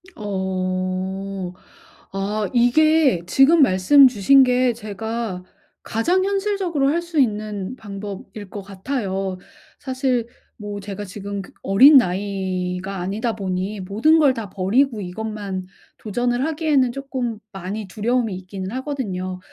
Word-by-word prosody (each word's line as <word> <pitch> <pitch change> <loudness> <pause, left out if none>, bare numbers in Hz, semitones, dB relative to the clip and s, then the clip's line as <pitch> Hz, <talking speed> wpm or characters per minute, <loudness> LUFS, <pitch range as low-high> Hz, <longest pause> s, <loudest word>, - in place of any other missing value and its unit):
어. 190 - -3 0.6
아 200 +1 -2
이게 270 - +4
지금 290 - +5
말씀 265 +5 +6
주신 255 +4 +5
게 250 -1 +2
제가 220 -2 -5 0.4
가장 350 +12 +1
현실적으로 390 -8 0
할 335 +4 +1
수 340 -3 -2
있는 210 -3 -1
방법일 205 -2 -8
것 205 - -7
같아요. 195 -2 -3 0.4
사실 255 -3 -1 0.3
뭐 205 -1 -6
제가 200 0 -6
지금 200 +1 -6
그 195 - -13
어린 265 +10 +7
나이가 190 -2 -1
아니다 210 +6 -2
보니 195 0 -3
모든 225 - +3
걸 285 -4 +5
다 225 -5 -6
버리고 215 +6 +1
이것만 200 0 -5 0.3
도전을 245 +4 -1
하기에는 300 -5 +1
쪼끔 255 -4 -4
많이 195 +2 -5
두려움이 225 +1 -1
있기는 185 +1 -7
하거든요. 215 -9 -4
210 Hz, 250 characters per minute, -21 LUFS, 190-260 Hz, 0.6 s, 어린